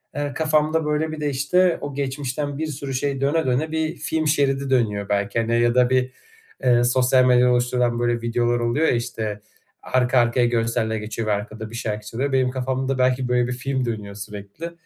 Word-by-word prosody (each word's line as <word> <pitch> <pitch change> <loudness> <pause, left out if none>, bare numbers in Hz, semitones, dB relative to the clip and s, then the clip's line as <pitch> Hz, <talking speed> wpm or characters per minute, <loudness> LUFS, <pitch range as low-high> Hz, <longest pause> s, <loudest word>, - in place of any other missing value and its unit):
eee, 145 -1 -2
kafamda 155 0 +1
böyle 150 +1 0
bir 155 -1 -6
de, 150 - 0
işte, 165 +7 +2
o 145 - -5
geçmişten 140 +1 -3
bir 160 +1 -2
sürü 140 -2 -5
şey 135 +1 -2
döne, 155 +4 +1
döne 135 +5 0
bir 160 +1 -1
film 160 -1 -1
şeridi 140 -2 +1
dönüyor 105 -6 0
belki, 100 +3 0
hani, 115 +1 +1
ya 120 0 +2
da 125 -1 +4
bir, 130 0 +1 0.5
ııı, 120 -1 +4
sosyal 130 +1 +3
medyada 125 0 +5
oluşturulan 120 -1 +1
böyle 120 -1 0
videolar 120 +1 0
oluyor 120 +7 +1
ya, - - +3
işte, 110 -3 -3 0.4
arka 130 0 +2
arkaya 120 +1 +3
görseller 115 -1 0
geçiyor 110 +1 -4
ve - - +1
arkada 110 +2 -5
bir 115 - -9
şarkı 105 -2 -4
çalıyor. 130 +6 -2
Benim 130 -1 +2
kafamda 130 +1 -2
belki 130 0 +2
böyle 125 0 +2
bir 125 - -2
film 130 +1 -2
dönüyor 105 -4 -5
sürekli 105 +10 -8
125 Hz, 195 wpm, -22 LUFS, 120-140 Hz, 0.5 s, medyada